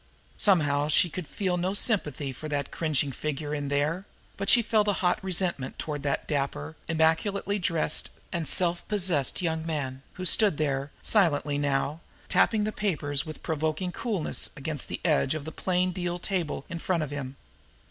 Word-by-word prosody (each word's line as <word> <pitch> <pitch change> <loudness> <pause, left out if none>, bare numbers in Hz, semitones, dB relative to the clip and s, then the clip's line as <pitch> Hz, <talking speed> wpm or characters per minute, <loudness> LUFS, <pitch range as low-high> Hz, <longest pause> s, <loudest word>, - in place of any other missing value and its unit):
Somehow 145 -7 +3
she 170 +3 +3
could 180 -2 -5
feel 185 0 -1
no 185 +3 -1
sympathy 150 - 0
for 155 +4 -7
that 145 -1 -2
cringing 150 -4 0
figure 150 +1 -3
in 145 -1 -2
there; 150 +7 0 0.3
but 195 0 -2
she 240 - +6
felt 215 -1 +2
a 205 - +3
hot 180 +2 +2
resentment 175 -7 0
toward 150 -2 -3
that 140 -1 -1
dapper, 135 - -2
immaculately 180 +6 +1
dressed 165 -4 0 0.2
and 170 -4 -2
self 175 -1 +3
possessed 180 -8 +1
young 160 -1 0
man, 140 -5 -3
who 185 - -6
stood 200 -3 +6
there, 140 -2 -1
silently 150 -8 +2
now, 145 +2 0 0.3
tapping 215 -2 +3
the 215 - -1
papers 155 -8 -1
with 155 - -8
provoking 160 +2 -1
coolness 200 -5 -1
against 150 -1 -3
the - - -5
edge 150 -3 +2
of 150 -2 -5
the 160 - -5
plain 185 +2 0
deal 175 -1 -2
table 175 -6 -2
in 170 0 -5
front 170 -2 0
of 145 - -5
him. 140 -2 -5
160 Hz, 170 wpm, -28 LUFS, 145-185 Hz, 0.3 s, she